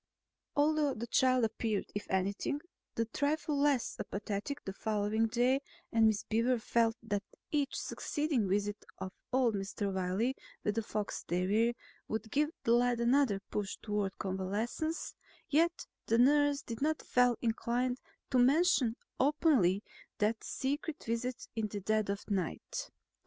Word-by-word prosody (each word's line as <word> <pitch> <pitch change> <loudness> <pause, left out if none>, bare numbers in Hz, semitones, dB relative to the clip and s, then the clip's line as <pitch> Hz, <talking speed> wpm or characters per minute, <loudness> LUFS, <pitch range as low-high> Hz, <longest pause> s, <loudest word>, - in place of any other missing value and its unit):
Although 295 -1 +3
the 230 - -4
child 255 0 +3
appeared, 220 -1 -1
if 205 - -5
anything, 195 +9 0 0.4
a 230 - +2
trifle 290 +5 0
less 280 -4 +2
apathetic 210 +8 -4
the 195 - -4
following 215 +2 0
day 250 +4 +2 0.3
and 225 -1 +5
Miss 215 -2 +1
Beaver 235 +3 +2
felt 230 0 +2
that 205 -3 -1 0.3
each 290 -2 0
succeeding 290 - -1
visit 205 +2 0
of 190 - -5 0.2
old 255 -3 +3
Mr. 200 0 -2
Wiley 190 +7 0 0.3
with 210 - +1
the 225 - 0
fox 210 -1 -3
terrier 205 +7 +2 0.3
would 220 0 -3
give 295 +1 +2
the 230 - +2
lad 240 0 +4
another 235 -4 +3
push 205 -2 -2
toward 205 -2 -2
convalescence, 205 - -2 0.4
yet 335 +4 +2 0.2
the 230 - +3
nurse 285 +3 +4
did 230 +1 -6
not 310 +1 +1
feel 250 -2 +3
inclined 245 +2 0 0.3
to 255 - +4
mention 265 -3 +4 0.2
openly 260 - +3 0.3
that 220 +2 +1
secret 290 +3 -3
visit 235 +2 -3
in 220 -2 0
the 205 0 -5
dead 215 +1 0
of 200 0 -3
night. 190 -5 -3
230 Hz, 140 wpm, -33 LUFS, 205-270 Hz, 0.4 s, and